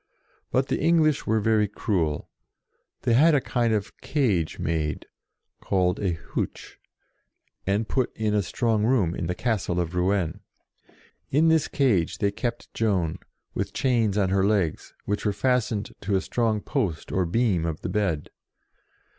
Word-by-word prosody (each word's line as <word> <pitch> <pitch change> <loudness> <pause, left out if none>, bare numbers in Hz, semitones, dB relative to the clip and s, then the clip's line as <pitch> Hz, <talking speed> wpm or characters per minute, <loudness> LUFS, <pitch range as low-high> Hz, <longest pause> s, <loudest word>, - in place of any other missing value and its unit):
But 130 +1 +1
the - - 0
English 155 -2 +3
were 110 +1 +3
very 110 0 +2
cruel. 90 -7 -1 0.8
They 120 - +2
had 150 +6 +6
a - - +4
kind 120 -3 0
of 105 +1 -1
cage 105 - 0
made, 80 -2 -2 0.6
called 90 -2 +1
a 95 -4 0
huche, 85 - -5 0.9
and 105 +3 +1
put 130 -2 0
in 110 -1 0
a 105 - +3
strong 110 +3 0
room 110 -8 +2
in 85 - -3
the 90 - -2
Castle 100 -7 -1
of 85 0 -2
Rouen. 90 -1 0 0.9
In 155 +4 +4
this 160 -2 +3
cage 110 - +1
they 100 -1 +1
kept 120 +3 -4
Joan, 90 -6 0 0.3
with - - -3
chains 115 -6 +1
on 100 -3 +2
her 95 0 +3
legs, 100 -6 0
which 105 0 -2
were 105 - +1
fastened 110 -1 0
to 100 0 0
a 95 - +2
strong 110 0 0
post 100 - -2
or 90 -2 +1
beam 95 -4 +1
of 80 -2 -4
the - - -3
bed. 95 -8 -1
105 Hz, 155 wpm, -25 LUFS, 90-120 Hz, 0.9 s, had